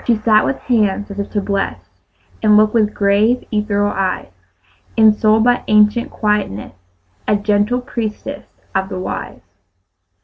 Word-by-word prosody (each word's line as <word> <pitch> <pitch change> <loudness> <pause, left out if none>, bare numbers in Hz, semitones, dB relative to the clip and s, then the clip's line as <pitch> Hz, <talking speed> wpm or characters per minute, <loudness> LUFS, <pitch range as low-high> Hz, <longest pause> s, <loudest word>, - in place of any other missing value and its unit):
She 235 - +4
sat 215 0 +3
with 270 - -1
hands 210 -4 0
as 200 - -7
if 200 - -3
to 205 - -1
bless, 200 0 -2 0.6
And 210 -1 +5
looked 215 0 +3
with 215 -3 +2
grave, 210 +5 +2
ethereal 205 -1 0
eyes; 185 - -2 0.7
Ensouled 220 0 +4
by 245 +1 +2
ancient 210 +2 +3
quietness, 210 - -2 0.5
A 210 - +3
gentle 205 +4 0
priestess 230 -4 -5 0.3
of 190 0 -1
the 190 - -5
Wise. 185 - -6
210 Hz, 140 wpm, -17 LUFS, 205-220 Hz, 0.7 s, And